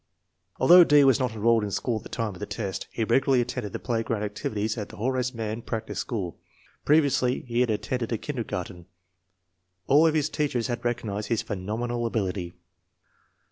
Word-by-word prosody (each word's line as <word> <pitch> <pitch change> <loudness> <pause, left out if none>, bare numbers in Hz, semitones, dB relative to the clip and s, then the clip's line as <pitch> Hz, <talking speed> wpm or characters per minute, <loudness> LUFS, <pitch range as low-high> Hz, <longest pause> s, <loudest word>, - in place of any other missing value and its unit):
Although 180 +1 +9
D. 145 -3 +6
was 135 -1 +5
not 125 -3 -1
enrolled 115 +1 +2
in 105 - -2
school 115 +3 -1
at - - -6
the - - -11
time 115 -4 -3
of 90 - -12
the - - -5
test, 100 -4 -4
he 115 - -2
regularly 130 +3 +3
attended 120 -3 -3
the - - -3
playground 115 -3 -2
activities 105 +1 -2
at 105 -3 -5
the - - -12
Horace 125 +2 0
Mann 115 -1 -4
practice 115 -1 -4
school. 95 -8 -4 0.5
Pre 150 +2 +6
viously 130 -3 0
he 120 -1 -1
had 125 -1 +3
attended 110 +3 -2
a 115 - +1
kindergarten. 95 - -5 1.0
All 150 +4 +5
of 160 - +1
his 150 -3 +2
teachers 130 -6 -1
had 120 -1 -3
recognized 110 -4 -2
his 115 -2 0
phenomenal 115 +5 -3
ability. 95 -5 -3
115 Hz, 180 wpm, -26 LUFS, 105-125 Hz, 1.0 s, Although